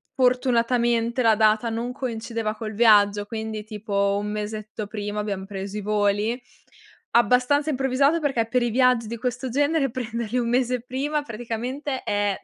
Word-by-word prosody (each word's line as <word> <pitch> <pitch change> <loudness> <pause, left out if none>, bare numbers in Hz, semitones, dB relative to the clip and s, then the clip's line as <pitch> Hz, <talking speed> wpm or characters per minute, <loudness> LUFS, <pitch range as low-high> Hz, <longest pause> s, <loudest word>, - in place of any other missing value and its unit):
fortunatamente 240 -2 +2
la 225 -2 +5
data 215 +1 +3
non 230 +2 -2
coincideva 230 -4 -3
col 215 0 -5
viaggio, 205 -2 +5
quindi 220 -1 -5
tipo 200 -2 -1
1 210 0 -4
mesetto 215 0 -5
prima 210 0 -4
abbiam 200 -2 -3
preso 195 0 -6
i 210 - -3
voli. 210 +3 0 0.7
Abbastanza 250 +6 +3
improvvisato 275 +4 +2
perché 265 -6 0
per 250 +2 +1
i 240 - +1
viaggi 250 -1 +3
di 235 +2 -5
questo 250 +3 -3
genere 285 +2 +1
prenderli 235 -1 -3
1 240 -1 0
mese 250 0 +1
prima 280 +4 -2
praticamente 250 +4 -4
è 205 -1 0
230 Hz, 150 wpm, -24 LUFS, 215-250 Hz, 0.7 s, la